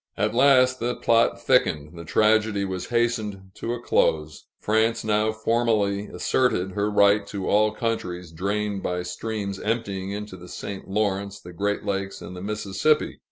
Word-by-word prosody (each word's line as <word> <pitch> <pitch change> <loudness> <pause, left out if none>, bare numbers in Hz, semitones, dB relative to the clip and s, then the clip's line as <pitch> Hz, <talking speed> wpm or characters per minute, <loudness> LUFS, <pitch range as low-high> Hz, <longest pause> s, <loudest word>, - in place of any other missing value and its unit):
At 105 +2 0
last, 130 0 +5
the 120 +1 -1
plot 115 0 +2
thickened; 75 +1 +1
the 85 - -8
tragedy 105 +2 +2
was 95 -1 -4
hastened 110 -5 -1
to 115 +4 -3
a - - -7
close. 75 -9 0
France 110 +2 +1
now 110 0 +2
formally 110 -2 0
asserted 105 -8 0
her 105 +2 -1
right 100 0 +4
to 100 -2 -4
all 105 +1 +3
countries 90 -7 -3
drained 100 +3 -2
by 90 -1 -2
streams 100 +2 -4
emptying 100 -4 -2
into 105 -1 -6
the 90 0 -12
St. 95 +1 -7
Lawrence, 100 -1 -1
the 90 - -11
Great 100 +4 -2
Lakes, 95 -1 -2
and 90 - -9
the 90 - -7
Mississippi. 105 +8 0
105 Hz, 160 wpm, -24 LUFS, 95-110 Hz, -, last